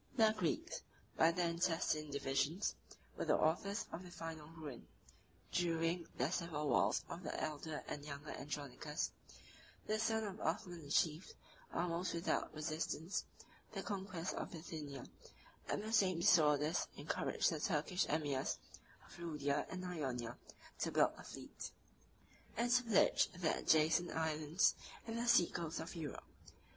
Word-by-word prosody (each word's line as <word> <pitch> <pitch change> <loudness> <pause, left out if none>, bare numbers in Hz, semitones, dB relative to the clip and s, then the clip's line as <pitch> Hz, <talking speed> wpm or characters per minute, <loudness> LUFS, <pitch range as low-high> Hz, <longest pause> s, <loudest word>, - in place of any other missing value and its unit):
] - - -27
The 220 -3 +6
Greeks, 175 -6 -1 0.3
by 160 +1 +6
their 175 0 +1
intestine 165 -3 +1
divisions, 140 +6 +1 0.4
were - - -2
the - - +4
authors 195 +6 +1
of 170 - -4
their 180 - -10
final 165 -3 -6
ruin. 155 -6 -8 0.6
During 170 0 +1
the 130 +6 +1
civil 160 -5 -1
wars - - +3
of 170 - -6
the 155 - -3
elder 155 0 -3
and 145 - -4
younger 145 0 -6
Andronicus, 145 +1 -3 0.7
the 215 0 +1
son 220 0 +2
of 205 -1 -4
Othman 170 0 -2
achieved, 155 +3 +1 0.4
almost 175 +1 0
without 170 +2 0
resistance, 155 +3 -2 0.5
the - - -3
conquest 190 -4 -3
of - - -3
Bithynia; 155 -5 -6 0.6
and 205 - 0
the 220 +1 -4
same 185 -6 +4
disorders 150 -1 +5
encouraged 145 +4 +1
the 160 - -2
Turkish 165 +2 +1
emirs 145 -3 0 0.5
of - - -13
Lydia 145 -4 0
and 185 0 -4
Ionia 130 -9 -2 0.4
to - - 0
build - - +5
a - - -11
fleet, - - -7 0.9
and 240 +2 +2
to 245 +1 +5
pillage 225 -5 +5
the 170 -3 +1
adjacent 160 +3 +4
islands 160 +2 +2 0.3
and 230 0 -3
the 240 - -1
sea 235 -8 +6
coast 165 -1 -3
of 165 +3 -5
Europe. 155 -5 -5
165 Hz, 145 wpm, -39 LUFS, 150-180 Hz, 0.9 s, The